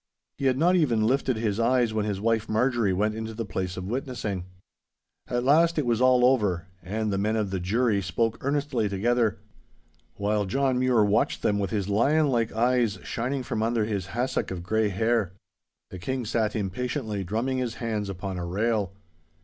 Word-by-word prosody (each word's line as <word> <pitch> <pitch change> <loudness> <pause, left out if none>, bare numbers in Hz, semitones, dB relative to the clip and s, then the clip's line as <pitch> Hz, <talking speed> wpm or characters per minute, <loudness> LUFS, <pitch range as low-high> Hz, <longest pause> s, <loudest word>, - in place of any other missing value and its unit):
He 140 - -2
had 130 -1 +3
not 175 +5 +4
even 120 -11 +2
lifted 130 +1 +1
his 110 -1 -1
eyes 120 -1 +2
when 110 -1 0
his 100 -2 -2
wife 115 +1 0
Marjorie 115 -2 +2
went 105 +4 +1
into 110 0 -5
the 115 0 -3
place 95 -1 -4
of 90 - -5
witnessing. 110 -5 -3 0.8
At 120 0 -1
last 165 +5 +4
it 150 - +1
was 120 0 +1
all 130 -1 +5
over, 105 -10 +2 0.2
and 105 +2 -2
the 95 - 0
men 105 +2 0
of 105 -3 -1
the 95 - -1
jury 105 +3 +1
spoke 110 +5 -1
earnestly 140 -5 0
together, 115 +2 +1 0.8
while 105 0 0
John 130 +4 +1
Mure 125 -4 +3
watched 105 +1 +1
them 100 -1 +2
with 100 - -1
his 100 -4 -2
lionlike 120 +2 +2
eyes 120 -2 +1
shining 130 +3 -2
from 110 - -3
under 115 -1 +1
his 100 -4 -3
hassock 120 +6 -2
of 90 -2 -5
grey 110 +3 +1
hair. 110 -1 0 0.6
The 95 - -7
King 130 +6 -3
sat 110 0 0
impatiently 110 +1 -2
drumming 115 +8 -1
his 120 -3 -2
hands 110 -3 -3
upon 95 0 -5
a 85 - -3
rail. 105 +1 0
110 Hz, 180 wpm, -26 LUFS, 100-125 Hz, 0.8 s, all